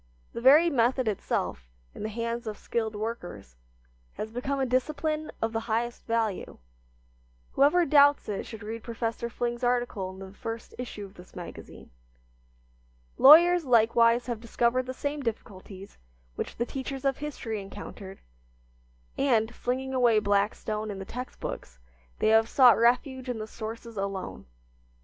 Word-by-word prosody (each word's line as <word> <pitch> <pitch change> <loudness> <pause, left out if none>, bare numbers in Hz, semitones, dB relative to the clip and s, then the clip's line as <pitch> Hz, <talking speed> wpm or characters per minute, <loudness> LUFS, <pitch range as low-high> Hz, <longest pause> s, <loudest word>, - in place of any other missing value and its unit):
The 235 - -5
very 290 +7 +7
method 250 -1 +2
itself, 60 - -2 0.2
in - - -10
the 215 - -3
hands 230 +1 -4
of 210 -1 -4
skilled 220 -2 -3
workers, 180 - -6 0.6
has 220 - -6
become 270 +4 -2
a 265 - +1
discipline 305 +5 -1
of 225 0 -1
the 225 - 0
highest 235 +2 -2
value. 225 -4 -1 0.9
Whoever 305 +6 +4
doubts 285 0 +5
it 205 -2 -4
should 220 -2 -9
read 225 +2 -5
Professor 230 0 -3
Fling's 240 +1 -3
article 245 -6 0
in 190 - -10
the 190 0 -10
first 225 +2 -7
issue 220 -4 -6
of 195 - -14
this 180 -1 -15
magazine. 175 -2 -10 1.3
Lawyers 345 +5 +8
likewise 235 -1 +4
have 235 -3 -4
discovered 240 +2 0
the 255 - -4
same 290 +2 -3
difficulties 200 -4 -7 0.3
which - - -5
the 235 - -1
teachers 270 +1 -6
of 270 -1 +1
history 250 -8 -4
encountered, 195 0 -9 1.0
and, 235 -5 +2
flinging 260 +2 -3
away 240 -4 +4
Blackstone 210 +1 0
and 200 -2 -5
the 195 - -6
text 250 +5 -7
books, - - -6 0.4
they - - +2
have 225 +1 +4
sought 250 -3 +7
refuge 255 +2 +1
in 245 - -2
the 215 - -4
sources 225 +1 -8
alone. 195 - -4
230 Hz, 150 wpm, -28 LUFS, 215-255 Hz, 1.3 s, Lawyers